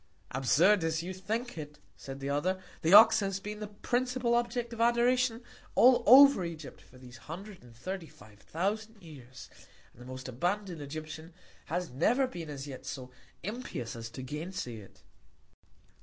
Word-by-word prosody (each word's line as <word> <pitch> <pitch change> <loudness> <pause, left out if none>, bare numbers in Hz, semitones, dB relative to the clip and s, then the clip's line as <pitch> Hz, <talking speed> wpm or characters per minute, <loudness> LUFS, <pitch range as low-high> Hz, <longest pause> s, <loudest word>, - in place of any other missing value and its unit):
Absurd 160 +10 +3
as 160 0 -1
you 185 +2 -5
think 215 +2 -4
it, 150 -1 -8 0.2
said 135 0 -9
the 135 - -3
other, 185 +7 0 0.2
the 160 - +1
Ox 220 +3 +9
has 195 -2 -2
been 210 +1 -7
the 210 - -5
principal 245 +3 -1
Object 235 0 -1
of 230 - -4
Adoration 240 0 +2 0.3
all 245 0 +6
over 275 -3 +8
Egypt, 165 -3 -7
for 130 - -19
these 125 -1 -13
hundred 190 +3 -8
and 120 -1 -17
thirty 185 +7 -6
five 105 -5 -17
thousand 210 - -3
Years, 130 -6 -12 0.5
and 125 - -18
the 125 - -11
most 130 0 -7
abandon'd 175 - -2
Egyptian 155 +3 -8 0.3
has 175 -1 -3
never 235 - +2
been 170 -11 -7
as 140 -2 -6
yet 135 -3 -9
so 130 -2 -7 0.3
impious 205 - -5
as 115 0 -7
to 130 +3 -8
gain 150 +7 -5
say 120 -11 -5
it. 100 -3 -15
175 Hz, 170 wpm, -30 LUFS, 135-220 Hz, 0.5 s, Ox